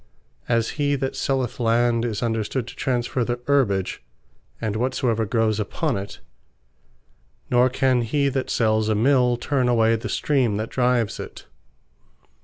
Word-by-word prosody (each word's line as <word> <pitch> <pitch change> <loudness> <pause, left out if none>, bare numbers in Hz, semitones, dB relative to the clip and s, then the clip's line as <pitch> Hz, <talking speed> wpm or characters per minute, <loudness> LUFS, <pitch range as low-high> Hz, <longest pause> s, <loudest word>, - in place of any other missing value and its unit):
As 115 -1 +1
he 145 0 +2
that 135 -1 -3
selleth 130 -3 -1
Land, 115 0 +2
is 110 -1 -3
understood 115 +2 -1
to 120 - -10
transferre 125 -1 -1
the 120 +1 -2
Herbage, 105 -10 +1 0.6
and 110 -2 -2
whatsoever 115 -2 0
growes 110 0 +1
upon 135 +7 -1
it; 100 +1 -6 1.3
Nor 125 +1 +4
can 130 -1 +2
he 140 +5 0
that 135 -1 -2
sells 110 -1 +1
a 110 - +2
Mill 125 +1 +3
turn 130 0 0
away 115 -1 +3
the 115 - -5
Stream 130 -8 +1
that 110 +1 -3
drives 125 -3 +1
it. - - -9
120 Hz, 145 wpm, -23 LUFS, 110-130 Hz, 1.3 s, Nor